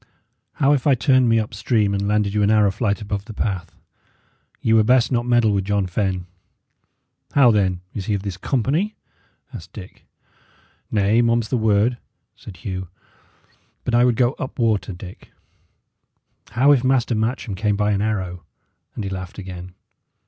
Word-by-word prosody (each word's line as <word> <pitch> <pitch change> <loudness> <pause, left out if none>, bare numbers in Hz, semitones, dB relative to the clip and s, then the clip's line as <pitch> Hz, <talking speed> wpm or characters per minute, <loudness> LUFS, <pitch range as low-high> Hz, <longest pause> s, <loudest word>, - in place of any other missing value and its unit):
How 140 0 +3
if 140 -2 0
I 140 - +5
turned 130 -1 +3
me 115 - +4
up 110 -1 -2
stream 105 -1 +1
and 100 0 -1
landed 105 -1 +1
you 105 - +1
an 100 - +3
arrow 105 -2 +4
flight 105 +1 -1
above 100 -1 -4
the 110 - -10
path? 95 -5 -3 0.8
Ye 110 - +1
were 110 -1 +5
best 125 +2 +3
not 120 -1 0
meddle 120 -3 +3
with 100 -2 0
John 100 -1 0
Fenne." 95 -1 -2 1.1
"How, 135 -4 +6
then? 95 -4 +1
is 95 -3 -5
he 105 - +1
of 100 - -4
this 100 -3 -4
company?" 140 - -1 0.6
asked 90 +2 -10
Dick. 95 -3 -12 0.8
"Nay, 105 +2 +2
mum 115 0 +2
is 110 - -8
the - - 0
word," 110 +1 +2 0.4
said 95 - -12
Hugh. 95 +1 -5 1.0
"But 120 - -3
I 120 +1 +5
would 125 -2 +3
go 120 +1 +3
up 130 - -5
water, 110 -4 0
Dick. 90 0 -11 1.2
How 130 +6 +4
if 135 -4 +4
Master 130 -2 +2
Matcham 110 0 -2
came 105 +1 0
by 105 +1 +1
an 100 -1 0
arrow?" 95 -5 -2 0.5
and 110 - -4
he 100 - -3
laughed 95 -1 -6
again. 90 -2 -8
105 Hz, 175 wpm, -21 LUFS, 100-120 Hz, 1.2 s, How